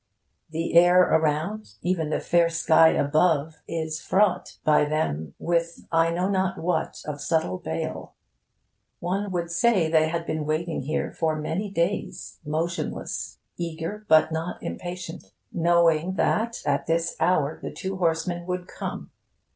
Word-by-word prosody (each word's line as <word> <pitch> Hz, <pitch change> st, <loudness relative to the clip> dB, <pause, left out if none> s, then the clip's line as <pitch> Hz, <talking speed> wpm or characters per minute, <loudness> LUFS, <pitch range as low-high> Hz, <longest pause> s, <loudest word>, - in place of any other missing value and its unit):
The 165 Hz, +1 st, -3 dB
air 175 Hz, +2 st, +7 dB
around, 160 Hz, -, 0 dB
even 170 Hz, -4 st, 0 dB
the -, -, 0 dB
fair 170 Hz, -1 st, +3 dB
sky 165 Hz, -1 st, +5 dB
above, 155 Hz, +1 st, +2 dB
is 160 Hz, -1 st, -3 dB
fraught 200 Hz, -1 st, +1 dB
by 150 Hz, -1 st, +4 dB
them 145 Hz, -, -2 dB
with 170 Hz, 0 st, -1 dB
I 165 Hz, 0 st, +3 dB
know 175 Hz, +2 st, 0 dB
not 190 Hz, -1 st, 0 dB
what 165 Hz, -1 st, -2 dB
of 145 Hz, -2 st, -5 dB
subtle 155 Hz, -, 0 dB
bale. 80 Hz, +1 st, -5 dB, 0.8 s
One 195 Hz, +4 st, -2 dB
would 170 Hz, -2 st, -2 dB
say 180 Hz, -3 st, +2 dB
they 160 Hz, -1 st, +4 dB
had 165 Hz, +1 st, -2 dB
been 155 Hz, -1 st, -2 dB
waiting 160 Hz, +1 st, -1 dB
here 150 Hz, +4 st, -2 dB
for 160 Hz, -2 st, 0 dB
many 160 Hz, +7 st, -3 dB
days, 185 Hz, +1 st, -2 dB
motionless, 160 Hz, +3 st, -3 dB, 0.2 s
eager 170 Hz, +5 st, -4 dB
but 155 Hz, 0 st, +5 dB
not 160 Hz, +2 st, -4 dB
impatient, 180 Hz, -1 st, -6 dB, 0.2 s
knowing 170 Hz, +1 st, +3 dB
that 230 Hz, +4 st, 0 dB
at 140 Hz, -1 st, 0 dB
this 165 Hz, +1 st, 0 dB
hour 155 Hz, -4 st, +1 dB
the -, -, -4 dB
two 190 Hz, 0 st, -5 dB
horsemen 175 Hz, 0 st, -1 dB
would 180 Hz, 0 st, -3 dB
come. -, -, -6 dB
165 Hz, 140 wpm, -25 LUFS, 155-180 Hz, 0.8 s, air